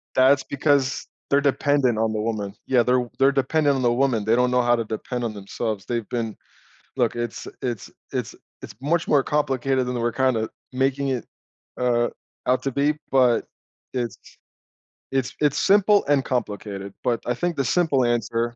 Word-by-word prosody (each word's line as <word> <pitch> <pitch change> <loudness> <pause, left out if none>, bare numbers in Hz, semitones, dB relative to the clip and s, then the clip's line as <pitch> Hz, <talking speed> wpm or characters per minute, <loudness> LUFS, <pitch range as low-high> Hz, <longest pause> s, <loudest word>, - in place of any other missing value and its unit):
That's 135 +1 +5
because 140 -1 +1 0.2
they're 140 0 +4
dependent 140 -3 +2
on 110 0 +1
the 110 - -2
woman. 105 -3 -2
Yeah, 125 -2 +4
they're 125 0 +1
they're 135 +1 +5
dependent 140 +1 +2
on 130 - -1
the 120 -1 +3
woman. 120 -4 +1
They 110 +2 +3
don't 125 0 +3
know 125 0 +3
how 120 0 +3
to 115 - -2
depend 120 +3 -4
on 110 -2 -3
themselves. 100 0 -4
They've 115 -3 -2
been 115 -3 -3 0.6
look, 120 -3 +1
it's 120 -1 -4
it's 120 -5 -4 0.2
it's - - -3 0.3
it's - - -10
much 165 +4 0
more 140 -2 +4
complicated 135 -3 0
than 125 - -2
we're 120 0 0
kinda 120 -4 +1 0.2
making 135 +1 0
it, 125 -4 -2 0.5
uh, 120 -1 +2 0.4
out 125 +1 +2
to 135 - -1
be, 145 +3 +1 0.2
but 125 -3 +4 0.5
it's 120 -3 -2 0.9
it's 135 -1 -1
it's 145 -2 +2
simple 205 +1 +4
and 140 -2 +3
complicated, 100 -5 -3
but 120 -2 0
I 125 - +1
think 170 +7 -2
the 135 - 0
simple 140 -5 +2
answer 120 0 0
125 Hz, 175 wpm, -23 LUFS, 115-135 Hz, 0.9 s, That's